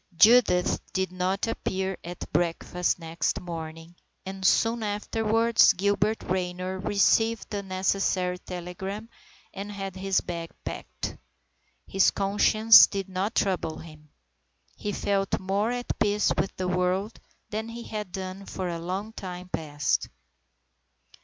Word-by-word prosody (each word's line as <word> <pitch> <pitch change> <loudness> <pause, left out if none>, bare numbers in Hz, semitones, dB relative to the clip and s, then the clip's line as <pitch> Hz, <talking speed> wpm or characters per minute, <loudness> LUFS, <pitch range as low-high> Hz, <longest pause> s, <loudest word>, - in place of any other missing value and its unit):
IV - - -25
JUDITH 220 -4 +4
did 190 -1 0
not 185 +2 -1
appear 190 -4 -2
at 175 +1 -8
breakfast 175 +1 0
next 165 -2 -2
morning, 165 -1 -7 0.3
and 190 0 -6
soon 225 +4 +3
afterwards 220 +2 +3
Gilbert 205 +3 +1
Raynor 185 0 -2
received 225 +3 +2
the 205 -1 -2
necessary 185 -1 0
telegram 190 +5 -6 0.4
and 200 +2 -6
had 195 -2 -5
his 190 0 +1
bag 170 -1 -5 0.2
packed. - - -5 0.7
His 195 0 +4
conscience 215 +3 +6
did 195 -1 -4
not 190 +3 -2
trouble 180 -5 0
him. 155 -2 -13 0.7
He 210 - -4
felt 195 -1 0
more 200 +4 0
at 245 0 -3
peace 205 0 +2
with 195 - -1
the 185 - -2
world 180 +4 0 0.3
than 220 +2 -3
he 235 +1 -7
had 210 -5 -5
done 190 +1 -6
for 185 -1 -3
a 170 -1 -3
long 190 +6 -4
time 180 -3 -7
past. 145 -4 -1
190 Hz, 130 wpm, -27 LUFS, 180-205 Hz, 0.7 s, conscience